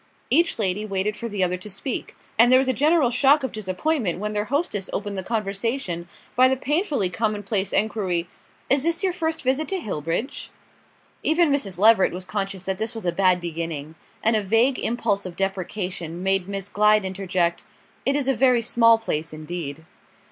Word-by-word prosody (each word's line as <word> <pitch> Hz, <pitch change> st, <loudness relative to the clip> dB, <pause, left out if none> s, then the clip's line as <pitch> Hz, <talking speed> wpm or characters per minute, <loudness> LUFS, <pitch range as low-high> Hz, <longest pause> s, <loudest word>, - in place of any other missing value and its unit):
Each 335 Hz, +1 st, +3 dB
lady 205 Hz, -1 st, 0 dB
waited 205 Hz, 0 st, -1 dB
for 235 Hz, -, -5 dB
the 200 Hz, -3 st, -1 dB
other 180 Hz, 0 st, 0 dB
to 185 Hz, +4 st, -8 dB
speak; 205 Hz, +6 st, -4 dB, 0.2 s
and 240 Hz, +2 st, +7 dB
there 255 Hz, -, +8 dB
was 265 Hz, 0 st, +2 dB
a 260 Hz, -, +2 dB
general 295 Hz, -1 st, +3 dB
shock 275 Hz, +3 st, +4 dB
of 265 Hz, -, -2 dB
disappointment 215 Hz, -, -1 dB
when 210 Hz, +2 st, -3 dB
their 210 Hz, 0 st, -1 dB
hostess 260 Hz, -, -2 dB
opened 205 Hz, -1 st, -3 dB
the 190 Hz, -, -1 dB
conversation 200 Hz, -3 st, -2 dB, 0.3 s
by 255 Hz, +1 st, +6 dB
the 265 Hz, 0 st, +1 dB
painfully 295 Hz, -, 0 dB
commonplace 205 Hz, +1 st, -1 dB
enquiry. 190 Hz, -5 st, 0 dB, 0.4 s
"Is 275 Hz, 0 st, +3 dB
this 335 Hz, +5 st, 0 dB
your 370 Hz, -2 st, +1 dB
first 325 Hz, -3 st, -2 dB
visit 265 Hz, +4 st, +1 dB
to 385 Hz, -, 0 dB
Hillbridge?" 210 Hz, -, -3 dB, 0.7 s
Even 320 Hz, -1 st, +3 dB
Mrs. 205 Hz, -11 st, 0 dB
Leveret 210 Hz, -1 st, +5 dB
was 180 Hz, +1 st, -6 dB
conscious 195 Hz, -1 st, -3 dB
that 190 Hz, -1 st, -3 dB
this 220 Hz, +1 st, -2 dB
was 225 Hz, -, -6 dB
a 175 Hz, -, +2 dB
bad 185 Hz, 0 st, +3 dB
beginning; 165 Hz, -3 st, -5 dB, 0.3 s
and 225 Hz, +1 st, +3 dB
a 215 Hz, -, +2 dB
vague 225 Hz, +6 st, +2 dB
impulse 210 Hz, -4 st, 0 dB
of 175 Hz, -, -9 dB
deprecation 185 Hz, -2 st, -3 dB
made 195 Hz, -1 st, +1 dB
Miss 195 Hz, -1 st, -4 dB
Glyde 210 Hz, 0 st, +3 dB
interject: 185 Hz, -2 st, -1 dB, 0.4 s
"It 275 Hz, -, +1 dB
is 285 Hz, -2 st, 0 dB
a 270 Hz, -, +3 dB
very 250 Hz, -1 st, +3 dB
small 230 Hz, -1 st, +5 dB
place 165 Hz, -8 st, -3 dB
indeed." 155 Hz, -1 st, -6 dB
210 Hz, 185 wpm, -23 LUFS, 185-255 Hz, 0.7 s, there